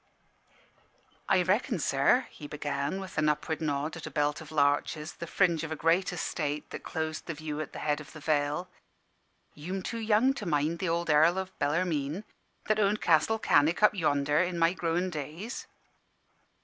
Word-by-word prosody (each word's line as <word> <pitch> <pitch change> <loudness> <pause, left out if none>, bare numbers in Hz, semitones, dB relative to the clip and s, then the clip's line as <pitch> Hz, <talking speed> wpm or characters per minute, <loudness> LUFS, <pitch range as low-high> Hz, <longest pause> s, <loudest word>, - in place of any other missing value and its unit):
"I 185 -2 +4
reckon, 205 +5 +1
sir," 150 - +3
he 150 - -9
began, 145 +3 -3
with 190 -1 -5
an 150 - +3
upward 150 +2 -1
nod 150 0 -1
at 165 - -7
a - - -4
belt 150 0 0
of 160 - -11
larches, 150 +1 +1
the 170 - -7
fringe 170 -2 +2
of 160 - -5
a - - -1
great 165 +4 +2
estate, 150 -2 -3
that - - -6
closed 160 -1 -4
the 170 - -3
view 155 0 -4
at 155 - -6
the - - -8
head 150 0 +1
of 150 - -12
the 155 - -10
vale, 150 +3 0 0.9
"you'm 180 +6 -5
too 230 - -4
young 225 +4 +3
to 215 -8 -6
mind 155 +1 0
th' 185 - -1
ould 170 -1 0
Earl 160 +4 +5
o' 190 0 -2
Bellarmine, 155 +1 0 0.4
that 215 0 +1
owned 205 0 +2
Castle 165 +7 +3
Cannick, 165 -3 +3
up 210 - +7
yonder, 145 -5 +1
in 180 -1 -1
my 165 +1 +3
growin' 175 +1 -1
days. 160 - -6
160 Hz, 180 wpm, -29 LUFS, 150-185 Hz, 0.9 s, up